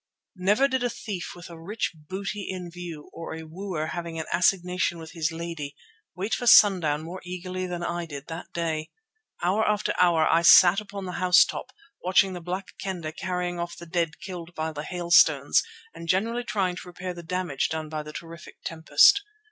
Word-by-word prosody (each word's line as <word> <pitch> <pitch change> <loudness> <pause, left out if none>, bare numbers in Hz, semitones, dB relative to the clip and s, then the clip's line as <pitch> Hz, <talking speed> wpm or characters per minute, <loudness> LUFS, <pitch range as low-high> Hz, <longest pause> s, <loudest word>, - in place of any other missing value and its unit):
Never 205 +9 +3
did 260 -2 -1
a 245 - +1
thief 200 -6 -6
with 175 -1 -10
a 165 - -10
rich 210 +7 -2
booty 195 +6 -5
in 180 -2 -5
view, 170 -4 -8
or 165 - -6
a 160 - -7
wooer 165 0 -4
having 170 -1 -5
an 160 - -3
assignation 180 0 +2
with 160 -1 -9
his 160 0 -1
lady, 165 -3 -6 0.4
wait 195 +5 -3
for 245 - -1
sundown 175 -10 +6
more 175 +3 -7
eagerly 185 +1 -5
than 175 -1 -4
I 170 0 -3
did 145 -2 -8
that 165 +1 -8
day. 160 -2 -2 0.5
Hour 190 +5 +2
after 210 0 0
hour 170 -3 +4
I 165 - +4
sat 180 +3 +8
upon 200 -2 -7
the 180 - -4
house 180 -1 +7
top, 260 - -6 0.3
watching 190 +1 +3
the 180 - -6
Black 185 +3 -4
Kendah 175 -5 -4
carrying 180 +1 -3
off 170 0 -4
the 170 - -9
dead 165 -1 -1
killed 175 -3 -8
by 160 0 -2
the 150 -1 -5
hailstones 165 -4 +4 0.3
and 165 0 -9
generally 230 +6 +1
trying 190 -5 -1
to 180 - -9
repair 180 +1 -6
the 175 - -8
damage 175 -5 -2
done 160 -1 -3
by 155 0 -4
the 150 0 -9
terrific 165 +1 -10
tempest. 160 - +5
175 Hz, 190 wpm, -26 LUFS, 165-185 Hz, 0.5 s, sat